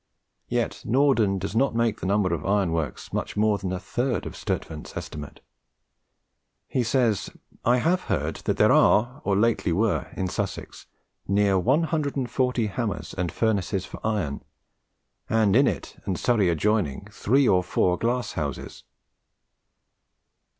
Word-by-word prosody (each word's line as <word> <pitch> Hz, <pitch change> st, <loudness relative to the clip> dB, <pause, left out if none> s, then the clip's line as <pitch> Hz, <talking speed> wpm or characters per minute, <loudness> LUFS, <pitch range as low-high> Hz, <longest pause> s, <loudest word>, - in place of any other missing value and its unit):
Yet -, -, -1 dB
Norden 120 Hz, -6 st, +3 dB
does 100 Hz, +2 st, -4 dB
not 135 Hz, 0 st, +2 dB
make 115 Hz, -2 st, +1 dB
the -, -, -3 dB
number 100 Hz, -3 st, +2 dB
of 80 Hz, -, -3 dB
iron 100 Hz, -3 st, +1 dB
works 80 Hz, -2 st, -3 dB
much -, -, -3 dB
more 105 Hz, -1 st, +2 dB
than 95 Hz, -2 st, -3 dB
a 95 Hz, -, -2 dB
third 120 Hz, +4 st, -2 dB
of -, -, -7 dB
Sturtevant's 75 Hz, -1 st, -5 dB
estimate. 75 Hz, -1 st, -7 dB, 1.3 s
He 130 Hz, -, 0 dB
says, 115 Hz, -4 st, +1 dB, 0.3 s
"I 120 Hz, +1 st, +4 dB
have 175 Hz, +8 st, +1 dB
heard -, -, -1 dB
that -, -, 0 dB
there -, -, +5 dB
are 120 Hz, +6 st, +4 dB
or 100 Hz, -, +1 dB
lately 115 Hz, -4 st, +2 dB
were 100 Hz, +5 st, +1 dB
in 95 Hz, -, -1 dB
Sussex 100 Hz, +1 st, -5 dB, 0.4 s
neere 100 Hz, -1 st, +3 dB
140 135 Hz, -, 0 dB
hammers 105 Hz, 0 st, -3 dB
and 90 Hz, -2 st, -2 dB
furnaces 100 Hz, -4 st, 0 dB
for -, -, -10 dB
iron, 100 Hz, -11 st, -1 dB, 0.9 s
and 110 Hz, -3 st, +3 dB
in 135 Hz, +2 st, +5 dB
it -, -, -4 dB
and 95 Hz, -, -1 dB
Surrey 110 Hz, -5 st, +2 dB
adjoining 85 Hz, -3 st, 0 dB
three 135 Hz, +5 st, +2 dB
or 90 Hz, -2 st, +4 dB
four 90 Hz, 0 st, +1 dB
glasse 120 Hz, +2 st, -1 dB
houses." 70 Hz, -5 st, -5 dB
105 Hz, 145 wpm, -25 LUFS, 95-120 Hz, 1.3 s, there